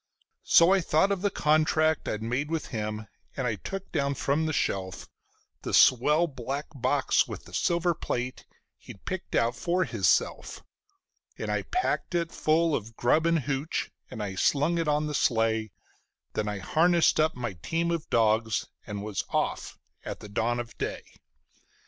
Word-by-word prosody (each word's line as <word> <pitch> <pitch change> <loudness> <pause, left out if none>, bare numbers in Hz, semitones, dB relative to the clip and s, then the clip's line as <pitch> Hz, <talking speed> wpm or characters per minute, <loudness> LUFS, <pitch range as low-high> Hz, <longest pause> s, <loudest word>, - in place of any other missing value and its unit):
So 170 +3 +6
I 195 - +3
thought 165 +4 +2
of 195 -2 -1
the 205 - +2
contract 155 -1 +2
I'd 105 +1 -3
made 125 +6 -2
with 165 -1 -3
him, 105 -2 -4 0.3
and - - -1
I - - +1
took 195 0 -6
down 140 -3 0
from 145 +4 0
the - - 0
shelf 95 -10 -2 0.5
The - - -1
swell 150 +7 +5
black 140 0 -4
box 135 +1 +1
with - - -8
the - - -15
silver 170 0 +1
plate 125 -4 -4 0.3
he'd 95 - -13
picked 185 -1 -4
out 115 +1 +2
for 180 +7 0
hisself; - - 0 0.7
And - - -3
I - - 0
packed 365 - -2
it 170 -1 0
full 160 +1 +2
of 115 +1 -5
grub 155 +9 +2
and 165 -2 +2
"hooch", 140 +3 -2 0.2
and 110 - -5
I 100 -2 -4
slung 150 - +2
it 165 - -1
on 150 0 +1
the 150 - -3
sleigh; 110 -5 +1 0.6
Then 105 - -2
I 105 -1 -2
harnessed 165 - +3
up 155 +1 +2
my 120 -4 -4
team 170 - -1
of 165 -2 -3
dogs 110 0 +2 0.2
and 100 -2 -5
was 105 -2 -3
off - - -2 0.3
at - - -6
dawn 120 +3 0
of 120 -1 -6
day. - - -3
145 Hz, 165 wpm, -27 LUFS, 115-165 Hz, 0.7 s, So